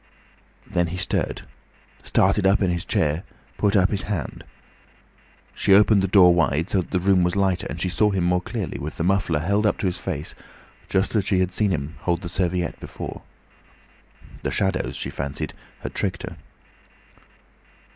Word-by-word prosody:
Then 85 Hz, -1 st, 0 dB
he 85 Hz, +2 st, -5 dB
stirred, 95 Hz, -, -1 dB, 0.6 s
started 95 Hz, -, +2 dB
up 100 Hz, +1 st, +3 dB
in 90 Hz, -, +2 dB
his 85 Hz, -1 st, -2 dB
chair, 75 Hz, +2 st, +1 dB, 0.4 s
put 100 Hz, 0 st, +2 dB
up 95 Hz, -1 st, +4 dB
his 100 Hz, -3 st, -1 dB
hand. 100 Hz, -10 st, -4 dB, 1.1 s
She 100 Hz, -, +4 dB
opened 105 Hz, 0 st, +5 dB
the 95 Hz, -, +1 dB
door 90 Hz, -2 st, +7 dB
wide, 85 Hz, 0 st, +1 dB
so 95 Hz, -, +3 dB
that -, -, -9 dB
the 90 Hz, -, 0 dB
room 95 Hz, 0 st, +3 dB
was 90 Hz, +1 st, +1 dB
lighter, 95 Hz, -2 st, +1 dB
and -, -, -5 dB
she -, -, 0 dB
saw 105 Hz, +4 st, +3 dB
him 95 Hz, -3 st, 0 dB
more 90 Hz, +1 st, +2 dB
clearly, 105 Hz, -2 st, -4 dB
with 75 Hz, +3 st, -6 dB
the 85 Hz, -, -1 dB
muffler 95 Hz, -3 st, +1 dB
held 100 Hz, +5 st, +2 dB
up -, -, +1 dB
to -, -, -3 dB
his 90 Hz, -1 st, -1 dB
face 80 Hz, -5 st, -5 dB, 0.6 s
just 95 Hz, 0 st, +1 dB
as 105 Hz, -4 st, +1 dB
she 95 Hz, -3 st, +2 dB
had 90 Hz, 0 st, +1 dB
seen 105 Hz, +2 st, +1 dB
him 80 Hz, -3 st, -3 dB
hold 85 Hz, 0 st, -1 dB
the 85 Hz, -, -4 dB
serviette 90 Hz, -1 st, -1 dB
before. -, -, -7 dB, 1.2 s
The -, -, -2 dB
shadows, 95 Hz, -1 st, -1 dB
she -, -, -4 dB
fancied, 70 Hz, 0 st, -4 dB, 0.3 s
had -, -, -6 dB
tricked 90 Hz, -4 st, -2 dB
her. -, -, -6 dB
90 Hz, 180 wpm, -23 LUFS, 85-100 Hz, 1.2 s, door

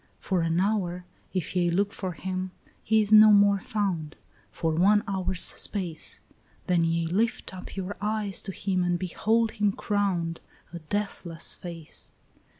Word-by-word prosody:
"For 185 Hz, -3 st, -1 dB
an 165 Hz, +1 st, +1 dB
hour, 180 Hz, -3 st, 0 dB, 0.3 s
if 185 Hz, -1 st, -3 dB
ye 175 Hz, -1 st, +2 dB
look 200 Hz, +4 st, +1 dB
for 185 Hz, -2 st, -4 dB
him, 185 Hz, +2 st, -4 dB, 0.3 s
he 220 Hz, 0 st, +3 dB
is 210 Hz, 0 st, +3 dB
no 215 Hz, 0 st, +9 dB
more 200 Hz, -1 st, +5 dB
found, 185 Hz, -7 st, -2 dB, 0.3 s
For 160 Hz, -1 st, -1 dB
one 200 Hz, +6 st, +4 dB
hour's 190 Hz, -2 st, 0 dB
space; 180 Hz, -6 st, -1 dB, 0.4 s
Then 175 Hz, -2 st, +2 dB
ye 165 Hz, 0 st, +1 dB
lift 200 Hz, +5 st, -1 dB
up 185 Hz, -, -9 dB
your 195 Hz, +1 st, -4 dB
eyes 210 Hz, -2 st, 0 dB
to 195 Hz, -, -5 dB
him 185 Hz, -1 st, -1 dB
and 175 Hz, 0 st, +1 dB
behold 220 Hz, +5 st, +1 dB
him 205 Hz, -1 st, +1 dB
crowned, 190 Hz, -5 st, -1 dB, 0.3 s
A 170 Hz, -, -5 dB
deathless 170 Hz, -1 st, -3 dB
face. 170 Hz, -3 st, -4 dB
185 Hz, 150 wpm, -27 LUFS, 170-205 Hz, 0.4 s, no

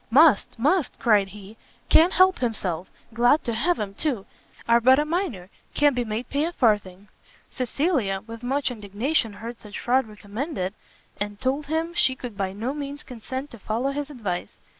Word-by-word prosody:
"Must, 285 Hz, -2 st, +5 dB
must," 295 Hz, +6 st, +1 dB
cried 210 Hz, -4 st, +3 dB
he, 205 Hz, +2 st, -12 dB, 0.3 s
"can't 335 Hz, +3 st, +6 dB
help 370 Hz, 0 st, +5 dB
himself; 190 Hz, -8 st, -2 dB, 0.2 s
glad 245 Hz, +6 st, +4 dB
to 235 Hz, -, -2 dB
have 325 Hz, +10 st, +1 dB
'em 200 Hz, -2 st, -3 dB
too. 235 Hz, -4 st, -2 dB, 0.4 s
Are 235 Hz, 0 st, +5 dB
but 260 Hz, +3 st, +6 dB
a 295 Hz, -, +2 dB
minor, 300 Hz, -, -2 dB, 0.2 s
can't 290 Hz, -2 st, +4 dB
be 245 Hz, -, +1 dB
made 220 Hz, +2 st, -4 dB
pay 285 Hz, +2 st, 0 dB
a 340 Hz, -, -2 dB
farthing." 205 Hz, -, +1 dB, 0.4 s
Cecilia 255 Hz, -, 0 dB
with 230 Hz, 0 st, -9 dB
much 265 Hz, +2 st, 0 dB
indignation 225 Hz, +3 st, -1 dB
heard 230 Hz, +3 st, -8 dB
such 210 Hz, -1 st, -9 dB
fraud 255 Hz, 0 st, +2 dB
recommended, 210 Hz, -, -4 dB, 0.5 s
and 205 Hz, 0 st, -3 dB
told 275 Hz, +3 st, -1 dB
him 320 Hz, +2 st, -1 dB
she 260 Hz, -6 st, +2 dB
could 245 Hz, -4 st, -7 dB
by 195 Hz, -1 st, -2 dB
no 225 Hz, +7 st, -3 dB
means 285 Hz, 0 st, -5 dB
consent 260 Hz, +3 st, -6 dB
to 235 Hz, -, -10 dB
follow 230 Hz, +7 st, -1 dB
his 290 Hz, +1 st, -4 dB
advice. 205 Hz, -11 st, -4 dB
240 Hz, 175 wpm, -25 LUFS, 210-285 Hz, 0.5 s, can't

